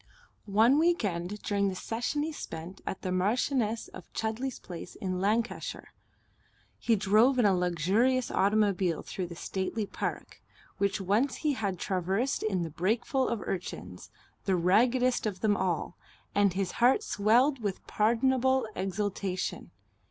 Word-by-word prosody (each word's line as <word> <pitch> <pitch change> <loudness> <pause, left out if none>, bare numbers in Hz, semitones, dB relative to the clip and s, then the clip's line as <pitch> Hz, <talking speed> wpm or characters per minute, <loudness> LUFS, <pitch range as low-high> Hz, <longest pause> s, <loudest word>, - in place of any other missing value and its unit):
One 225 +8 +4
week 340 -6 +2
end 180 +2 -3
during 200 -1 +1
the 190 - -4
session 240 +9 -2
he 320 - -2
spent 180 - -8
at - - -4
the 185 - -2
Marchioness 225 +4 0
of - - -12
Chudley's 225 +4 -2
place 175 -2 -9
in 185 -1 -3
Lancashire. 220 +4 -1 0.9
He 230 - +2
drove 215 +7 +4
in 245 - +4
a 200 - +5
luxurious 190 +9 +1
automobile 200 -4 +2
through 185 -2 -4
the 170 - -9
stately 190 +5 -3
park, - - -5 0.4
which 200 +1 +1
once 210 +8 +1
he 295 - +3
had 200 -7 -2
traversed 190 +9 -1
in 195 -5 0
the 165 - -5
brakeful 225 - 0
of 230 - -2
urchins, 90 - -6 0.4
the 190 - +2
raggedest 240 +8 +3
of 190 -3 -5
them 210 -2 +3
all, 175 -3 -2 0.4
and 200 -2 +3
his 190 -1 -1
heart 260 - +5
swelled 245 - +3
with 200 -3 -3
pardonable 260 +3 +2
exultation. 195 -1 -3
205 Hz, 145 wpm, -29 LUFS, 185-240 Hz, 0.9 s, a